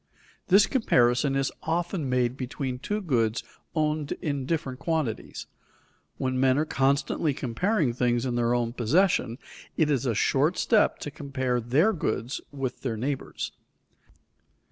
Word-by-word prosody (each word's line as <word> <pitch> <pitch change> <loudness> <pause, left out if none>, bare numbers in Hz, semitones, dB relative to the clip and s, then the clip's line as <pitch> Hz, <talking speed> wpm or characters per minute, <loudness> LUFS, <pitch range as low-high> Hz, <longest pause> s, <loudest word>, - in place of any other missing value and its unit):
This 195 +2 +6
comparison 135 - +2
is 135 -1 0
often 170 -2 -1
made 125 -1 +1
between 130 0 -4
two 210 +10 -2
goods 120 - 0 0.3
owned 155 -2 0
in 140 -3 -3
different 140 -6 -2
quantities. 155 -8 -2 0.7
When 130 -1 -1
men 130 0 +4
are 155 - +2
constantly 140 +1 +1
comparing 145 - 0
things 120 0 +1
in 125 - -1
their 120 0 +1
own 120 -1 -1
possession, 125 - +2 0.4
it 155 -2 +3
is 135 -2 0
a 115 - +1
short 145 - +2
step 220 -3 +3
to 145 - -5
compare 130 -4 -2
their 145 - +3
goods 125 -5 -2
with 135 -3 -4
their 120 -4 -2
neighbor's. 135 +4 -3
135 Hz, 140 wpm, -27 LUFS, 125-155 Hz, 0.7 s, This